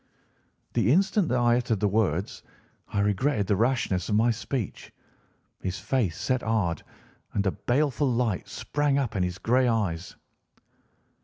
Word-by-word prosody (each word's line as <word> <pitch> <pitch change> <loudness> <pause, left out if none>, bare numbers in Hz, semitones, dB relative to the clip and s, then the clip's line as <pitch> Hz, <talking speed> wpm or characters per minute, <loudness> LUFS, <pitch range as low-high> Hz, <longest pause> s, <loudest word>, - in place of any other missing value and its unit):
"The 110 - +2
instant 190 +3 +3
that 125 - +1
I 120 0 +4
uttered 120 -4 0
the 105 - +2
words 95 -3 0 0.5
I 100 - -1
regretted 105 +3 +1
the 100 - +2
rashness 110 -5 0
of 105 - +2
my 115 +3 +4
speech. 115 -1 -4 0.7
His 95 0 -3
face 115 -11 -1
set 130 -1 0
hard, 105 -7 0 0.5
and 100 - 0
a 95 - +2
baleful 135 +3 0
light 115 -6 0
sprang 140 +4 0
up 130 -7 -1
in 95 - 0
his 90 0 -1
grey 125 +4 +2
eyes. 95 -7 -1
115 Hz, 150 wpm, -27 LUFS, 100-130 Hz, 0.7 s, I